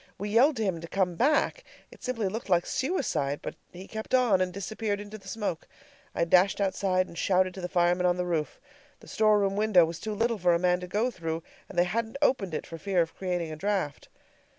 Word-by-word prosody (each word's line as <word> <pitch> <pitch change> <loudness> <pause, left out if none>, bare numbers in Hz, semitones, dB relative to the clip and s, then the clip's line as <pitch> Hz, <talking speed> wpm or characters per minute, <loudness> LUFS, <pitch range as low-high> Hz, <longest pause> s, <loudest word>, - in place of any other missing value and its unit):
We 205 +2 -4
yelled 255 +8 +4
to 220 - 0
him 185 -5 -1
to 170 - -7
come 185 0 0
back. 300 - +1 0.3
It - - -16
simply 230 -5 -1
looked 215 +3 -5
like 175 -2 +3
suicide; 225 - -1
but - - -4 0.2
he 185 +2 -10
kept 220 +3 -2
on, 235 -7 +3
and 185 0 0
disappeared 205 +2 -3
into 205 +1 -8
the 195 - -16
smoke. 200 -6 -3 0.5
I 170 - +2
dashed 185 +4 +4
outside 190 -1 +1
and - - -12
shouted 185 +1 +2
to 190 - -8
the 180 - -4
firemen 175 0 +2
on 175 0 +2
the 180 - -1
roof. 165 -4 -2 0.4
The - - -16
store 215 -1 +3
room 195 -1 +1
window 205 -5 +5
was 165 0 -6
too 215 -1 -4
little 230 0 0
for 175 -1 +3
a - - +3
man 180 0 +2
to 180 - -7
go 215 +7 0
through, 165 -4 -4 0.3
and 190 - -10
they 175 - +6
hadn't 225 +7 -2
opened 220 - +1
it - - -4
for 165 -1 -9
fear 185 0 +2
of 165 - -9
creating 175 -3 -2
a - - -5
draft. 185 -4 -2
190 Hz, 230 wpm, -28 LUFS, 175-215 Hz, 0.5 s, they